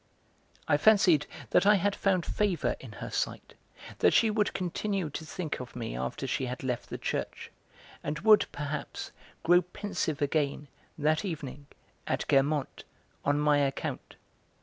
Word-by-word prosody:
I 145 - +4
fancied 180 -5 +5 0.2
that - - +4
I 210 - +7
had 200 +1 +1
found 185 -3 +1
favour 200 -7 0
in 120 -5 -10
her - - -7
sight, - - -3 0.5
that - - +4
she 225 -2 +5
would 210 -1 0
continue 185 -1 -2
to 160 - -5
think 170 -1 -4
of 125 -2 -8
me 115 - -4
after 65 - -3
she 130 0 -1
had 125 +2 -5
left 125 -2 -3
the - - -4
church, - - -4 0.5
and 150 +1 -2
would, 215 0 +6
perhaps, 145 +1 -5 0.3
grow 175 +2 +6
pensive 180 -4 -3
again, 145 -1 0 0.3
that 155 +2 +1
evening, 145 -6 -6 0.4
at - - -1
Guermantes, 140 +1 +1 0.4
on 145 +1 +2
my 150 -1 +4
account. 135 -1 -2
155 Hz, 150 wpm, -29 LUFS, 140-190 Hz, 0.5 s, I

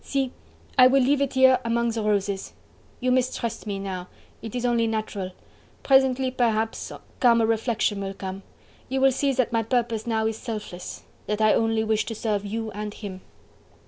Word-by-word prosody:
"See! 270 -2 -1 0.5
I 255 - +10
will 270 0 +4
leave 280 +2 +2
it 280 -1 0
here 260 -1 +6
among 235 0 +1
the 225 0 -2
roses!... 200 -2 -1 0.5
You 255 0 +2
mistrust 250 -3 -1
me 200 -1 -2
now... 190 -2 -5 0.3
it 225 +1 -7
is 245 0 -1
only 235 -1 +2
natural... 215 -4 -3 0.5
presently, 265 -1 +3
perhaps, 225 -3 0 0.3
calmer 235 -3 +5
reflection 225 -2 0
will 195 0 -4
come... 190 0 -6 0.5
you 265 +1 0
will 270 0 +5
see 275 +2 +1
that 255 -2 0
my 230 - +3
purpose 230 -1 -1
now 220 -1 +1
is 220 0 -1
selfless... 210 -6 -6 0.2
that 210 0 -1
I 215 -1 +5
only 225 -1 +2
wish 215 -1 +1
to 225 - -5
serve 210 -2 -1
you 225 +1 -3
and 210 +1 -5
him." 190 -3 -7
225 Hz, 175 wpm, -25 LUFS, 210-250 Hz, 0.5 s, I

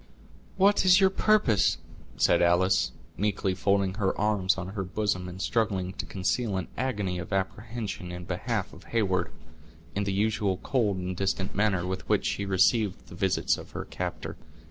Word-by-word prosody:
"What 200 +2 +4
is 185 0 +7
your 190 -1 +5
purpose?" 190 - +3 0.4
said - - +4
Alice, 85 +2 +3 0.3
meekly 100 -2 0
folding 100 0 +1
her 95 - 0
arms 100 -3 +2
on 95 0 -4
her 100 0 -3
bosom, 90 -1 -1
and 90 +1 -9
struggling 100 -4 0
to - - -5
conceal 100 +2 -1
an 95 - -4
agony 105 -8 -2
of 85 - -7
apprehension 100 -1 -3
in 90 0 -6
behalf - - -2
of - - -14
Heyward, 100 -5 0 0.6
in 100 - -1
the 100 - -1
usual 105 -1 +1
cold 105 -3 0
and 90 0 -3
distant 95 0 -1
manner 100 -4 +1
with 95 +1 -4
which - - +2
she 100 - -1
received 100 +1 +2
the - - -10
visits - - +1
of - - -12
her - - -4
captor. - - -5
100 Hz, 165 wpm, -28 LUFS, 95-110 Hz, 0.6 s, is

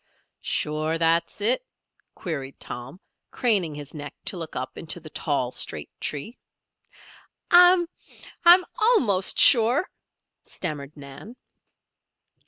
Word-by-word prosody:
"Sure 155 +2 -1
that's 165 +4 0
it?" 240 - +2 0.5
queried 140 -7 -6
Tom, 125 +8 -9 0.3
craning 195 - +1
his 145 0 -9
neck 145 -2 -8
to - - -1
look 165 -3 -7
up 130 +1 -5
into 165 +1 -6
the 155 -2 -12
tall, 135 -5 -2
straight - - -3
tree. 150 - -5 1.1
"I, 355 0 +7 0.6
I'm 355 +1 +7
almost 255 - +2
sure," 250 - +5 0.5
stammered 150 -4 -6
Nan. 140 - -11
165 Hz, 105 wpm, -24 LUFS, 145-235 Hz, 1.1 s, I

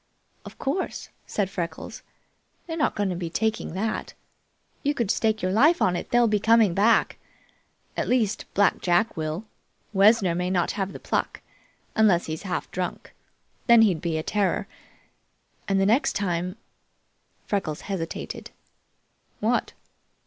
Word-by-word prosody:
"Of - - -11
course!" 285 +8 -3 0.2
said 205 -2 -1
Freckles. 170 -3 -5 0.6
"They're 325 - -4
not 305 - 0
going 205 -2 0
to 180 - -2
be 170 -1 -4
taking 220 0 -1
that. 215 +3 -3 0.7
You 290 +1 0
could 235 -7 0
stake 220 -2 0
your 185 - +1
life 300 - +4
on 180 - +2
it, - - -5
they'll 240 -1 +4
be 210 -1 +2
coming 225 -3 +4
back. 210 +5 +3 0.8
At - - -1
least, 230 -5 +1
Black 200 0 +3
Jack 185 +6 +2
will. 160 +5 -3 0.5
Wessner 200 -2 +5
may 180 +1 -1
not 180 -2 +1
have 195 -1 -3
the - - -8
pluck, - - -2 0.5
unless 205 -6 +4
he 155 - -4
is 160 - -6
half 185 -3 -4
drunk. 180 -1 -4 0.5
Then 235 -2 +8
he'd 180 -8 +2
be 165 -2 -1
a 155 - -2
terror. 205 +1 0 1.0
And 195 -1 +2
the 195 - +3
next 230 +8 +3
time 180 -2 -2 0.5
" - - -43
Freckles 175 -7 -2
hesitated. 180 -5 -5 0.9
"What?" - - 0
195 Hz, 150 wpm, -25 LUFS, 180-225 Hz, 1.0 s, Then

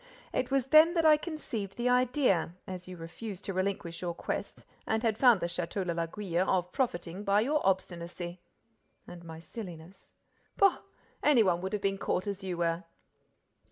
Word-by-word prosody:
It - - 0
was 270 -2 +2
then 310 +5 +6
that 330 -1 +2
I 310 -1 +8
conceived 270 - -5
the 240 +1 0
idea, 250 - +2
as 180 -1 -7
you 185 -1 -8
refused 190 +4 -7
to 195 - -3
relinquish 185 -3 -2
your 175 -2 -3
quest - - -5 0.2
and 220 +1 0
had 225 -2 +2
found 235 -3 +5
the - - 0
Château 175 +2 -2
de 170 - -1
l'Aiguille, 170 +2 -1
of 180 -1 +1
profiting 185 - -2
by 200 +1 +3
your 295 +6 +1
obstinacy." 175 -2 -2 0.6
"And 175 -1 -11
my 160 -1 -8
silliness." 175 -1 -10 0.5
"Pooh! 395 -2 +5 0.4
Any 275 -7 +5
one 175 -3 +2
would 190 +2 -4
have 205 -1 -2
been 195 0 0
caught 185 - -1
as 200 -1 -4
you 185 -2 -3
were!" 170 +1 0
190 Hz, 175 wpm, -30 LUFS, 175-235 Hz, 0.6 s, I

